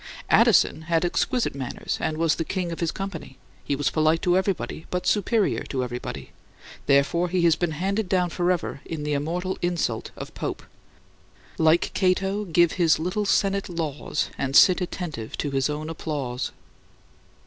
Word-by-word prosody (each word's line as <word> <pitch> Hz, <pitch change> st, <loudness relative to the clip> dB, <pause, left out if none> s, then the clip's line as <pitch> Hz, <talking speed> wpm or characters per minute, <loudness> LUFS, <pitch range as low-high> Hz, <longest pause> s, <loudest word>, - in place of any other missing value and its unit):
Addison -, -, +5 dB
had 165 Hz, +1 st, +2 dB
exquisite 245 Hz, +7 st, 0 dB
manners 135 Hz, -2 st, -4 dB
and 155 Hz, -, -1 dB
was 165 Hz, -1 st, +2 dB
the 165 Hz, -, -2 dB
king 180 Hz, +1 st, -3 dB
of 165 Hz, -, -5 dB
his 170 Hz, -, 0 dB
company; 165 Hz, -9 st, -6 dB, 0.3 s
he 140 Hz, -, -1 dB
was 145 Hz, 0 st, 0 dB
polite 155 Hz, +1 st, +2 dB
to 175 Hz, 0 st, +3 dB
everybody; 190 Hz, -4 st, -1 dB
but 180 Hz, 0 st, -2 dB
superior 210 Hz, +1 st, +1 dB
to 130 Hz, -2 st, -2 dB
everybody; 125 Hz, 0 st, -6 dB, 0.6 s
therefore 140 Hz, +6 st, +3 dB
he 180 Hz, 0 st, +1 dB
has 165 Hz, -2 st, +5 dB
been 170 Hz, -1 st, -1 dB
handed 195 Hz, +4 st, -1 dB
down 180 Hz, -2 st, +1 dB
forever 175 Hz, -5 st, -1 dB
in 160 Hz, -3 st, -5 dB
the 150 Hz, 0 st, -1 dB
immortal 175 Hz, +6 st, -2 dB
insult 170 Hz, -10 st, -1 dB
of -, -, -8 dB
Pope -, -, -4 dB, 1.0 s
"Like 160 Hz, +1 st, +3 dB
Cato, 195 Hz, +2 st, +1 dB
give 170 Hz, -2 st, +3 dB
his 170 Hz, -4 st, +3 dB
little 185 Hz, +6 st, -2 dB
Senate 195 Hz, 0 st, +1 dB
laws 155 Hz, -4 st, -3 dB
And 135 Hz, 0 st, -1 dB
sit 185 Hz, +3 st, +7 dB
attentive 160 Hz, -10 st, -5 dB
to 145 Hz, -, -2 dB
his 135 Hz, +1 st, +1 dB
own 150 Hz, +1 st, -3 dB
applause." 145 Hz, -6 st, -3 dB
170 Hz, 160 wpm, -25 LUFS, 150-185 Hz, 1.0 s, sit